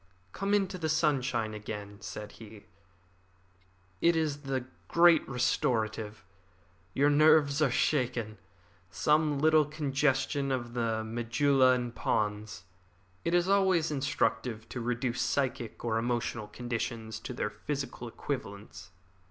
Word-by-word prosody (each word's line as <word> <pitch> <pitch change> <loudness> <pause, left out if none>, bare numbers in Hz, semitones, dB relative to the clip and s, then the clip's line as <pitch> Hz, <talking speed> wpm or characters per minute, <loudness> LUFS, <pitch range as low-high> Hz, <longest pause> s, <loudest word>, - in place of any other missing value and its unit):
"Come 200 - 0
into 195 -2 0
the 160 -2 -1
sunshine 135 -8 +1
again," 105 -1 -7
said 105 -1 -7
he. 110 -2 -13 1.4
"It 170 0 +4
is 155 -3 0
the 135 -3 -3 0.2
great 170 -1 +5
restorative. 110 -3 -1 0.7
Your 145 +2 +4
nerves 155 -1 +5
are 150 - +4
shaken. 125 -5 0 0.5
Some 150 +7 +2
little 155 +1 +5
congestion 140 -2 0
of 120 -2 -3
the 115 -2 -1
medulla 125 +4 +3
and 120 -2 -2
pons. 105 -3 -2 0.6
It 170 +1 +1
is 175 0 +3
always 190 -5 +3
instructive 130 -5 -1
to 125 - -5
reduce 120 +1 -1
psychic 130 -5 -2
or 115 -1 +1
emotional 120 -2 -2
conditions 115 -1 -4
to - - -7
their 105 - -2
physical 125 +3 -5
equivalents. 110 -5 -6
125 Hz, 120 wpm, -30 LUFS, 110-150 Hz, 1.4 s, great